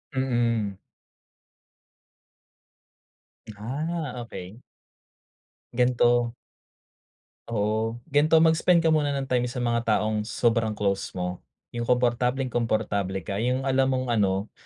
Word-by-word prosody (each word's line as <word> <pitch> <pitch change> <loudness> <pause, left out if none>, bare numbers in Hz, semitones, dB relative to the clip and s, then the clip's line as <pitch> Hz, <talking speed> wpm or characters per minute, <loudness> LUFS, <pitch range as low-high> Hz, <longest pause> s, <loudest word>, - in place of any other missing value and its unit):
Mm. 115 -6 0 2.8
Ah, 140 +4 -4
okey. 100 +1 -9 1.1
Gan'to. 120 -1 +2 1.1
Oo, 110 +1 -1 0.2
gan'to 155 +3 +5
mag-spend 165 +1 +4
ka 160 - +3
muna 145 -2 +2
ng 135 - -1
time 125 -2 0
sa 125 0 -4
mga 115 -1 0
taong 105 0 +1
sobrang 115 -3 +1
close 100 -2 -2
mo, 90 0 -3 0.3
'yung 120 -1 -4
komportableng-komportable 120 -6 0
ka, 100 +4 -3
'yung 125 +3 0
alam 135 0 +2
mong 130 0 -2
ano 100 -2 +1
120 Hz, 100 wpm, -26 LUFS, 105-130 Hz, 2.8 s, gan'to